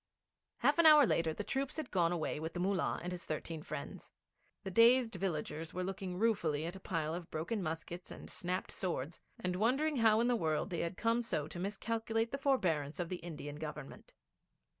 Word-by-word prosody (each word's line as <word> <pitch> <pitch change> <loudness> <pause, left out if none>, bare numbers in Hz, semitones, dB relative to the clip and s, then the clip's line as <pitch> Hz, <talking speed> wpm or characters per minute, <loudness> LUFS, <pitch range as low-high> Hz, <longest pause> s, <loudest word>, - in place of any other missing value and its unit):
Half - - +3
an 335 - +8
hour 300 -2 +9
later 165 -7 +2
the 210 - -4
troops 270 +6 -2
had 310 -5 -4
gone 175 -3 +3
away 160 -3 -1
with 160 +1 -4
the 175 - -4
Mullah 190 0 0
and 180 - -3
his 180 -1 -5
thirteen 155 +1 -4
friends. 150 -2 -7 0.5
The 190 - -4
dazed 235 +3 +6
villagers 165 -4 -3
were 185 - -1
looking 185 -1 -4
ruefully 175 -9 +1
at 175 +3 -4
a - - -8
pile 160 -4 -2
of 170 -1 -6
broken 185 +8 -2
muskets 170 +1 -5
and - - -9
snapped 180 +1 -3
swords, 165 -4 -3 0.2
and 180 0 -1
wondering 270 +8 +2
how 220 -2 +5
in 235 - +3
the 245 - +3
world 160 -2 0
they 170 - -2
had 170 +2 -2
come 230 +1 +2
so 155 -10 -2
to 175 - -7
miscalculate 225 +3 -1
the 275 - -3
forbearance 170 - +1
of 175 -1 -2
the 180 - -2
Indian 150 -4 -7
Government. 150 -2 -8
180 Hz, 200 wpm, -35 LUFS, 160-225 Hz, 0.5 s, hour